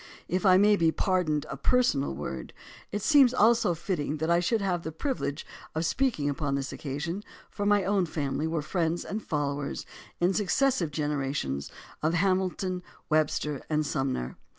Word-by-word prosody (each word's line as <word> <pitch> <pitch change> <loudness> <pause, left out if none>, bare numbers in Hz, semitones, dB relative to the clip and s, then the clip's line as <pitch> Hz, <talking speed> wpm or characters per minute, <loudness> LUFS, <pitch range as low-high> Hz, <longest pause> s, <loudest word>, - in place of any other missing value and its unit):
If 185 +2 +1
I 185 0 +7
may 205 +1 +5
be 165 -2 +3
pardoned 165 -5 0
a - - -5
personal 145 - +2
word, 65 -3 -6 0.4
it 205 -1 -3
seems 270 -2 +6
also 225 -6 +4
fitting 155 -4 -2
that 160 +2 0
I 170 - +5
should 220 +6 +1
have 185 -4 0
the 160 - -5
privilege 160 - -3 0.3
of 160 +2 0
speaking 220 - +1
upon 145 -1 -1
this 135 -1 -3
occasion, 155 +7 -4 0.3
for 205 -1 -2
my 205 -1 +4
own 195 -2 +1
family 150 0 -2
were 160 -2 -1
friends 165 +1 -1
and 215 +2 -4
followers 145 -4 -2 0.3
in 175 +2 +3
successive 210 - +1
generations 140 - -2 0.3
of 160 +2 +1
Hamilton 185 +1 +1
and 180 0 -6 0.3
Webster 150 -2 +1
and 155 -1 +1
Sumner. 135 - -2
165 Hz, 165 wpm, -28 LUFS, 145-195 Hz, 0.4 s, I